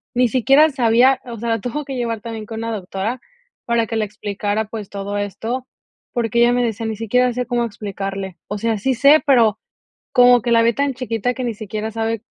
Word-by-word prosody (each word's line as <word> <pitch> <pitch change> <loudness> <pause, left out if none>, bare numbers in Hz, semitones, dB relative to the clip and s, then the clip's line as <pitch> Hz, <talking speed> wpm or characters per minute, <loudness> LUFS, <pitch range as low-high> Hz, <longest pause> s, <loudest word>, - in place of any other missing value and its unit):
Ni 250 -1 +3
siquiera 275 +6 +5
sabía, 255 0 +3
o 235 -2 -7
sea, 225 0 -1
tuvo 270 +7 -4
que 270 -1 -6
llevar 230 -3 -2
también, 225 -2 -6
con 225 +1 -6
una 230 0 -3
doctora 200 +5 -4 0.5
para 235 -2 +1
que 225 - -2
le 215 - +1
explicara, 205 +1 -3
pues, 215 -2 -7
todo 200 0 -4
esto, 225 +6 -4 0.5
porque 235 -1 0
ella 240 +1 +5
me 245 0 +2
decía: 225 -1 -2
"Ni 220 - -3
siquiera 245 +3 +1
sé 250 0 -2
cómo 240 0 0
explicarle". 195 -3 -5
O 205 - -4
sea, 225 +1 0
sí 260 +5 0
sé, 280 +5 +6
pero, 225 -6 +4 0.5
como 245 -1 +6
que 240 - -1
la 230 -1 +5
ve 235 +1 +3
tan 280 -1 0
chiquita, 245 -1 -2
que 255 - -4
ni 235 - -2
siquiera 215 +1 -5
sabe 225 0 -2
230 Hz, 210 wpm, -20 LUFS, 215-245 Hz, 0.5 s, sé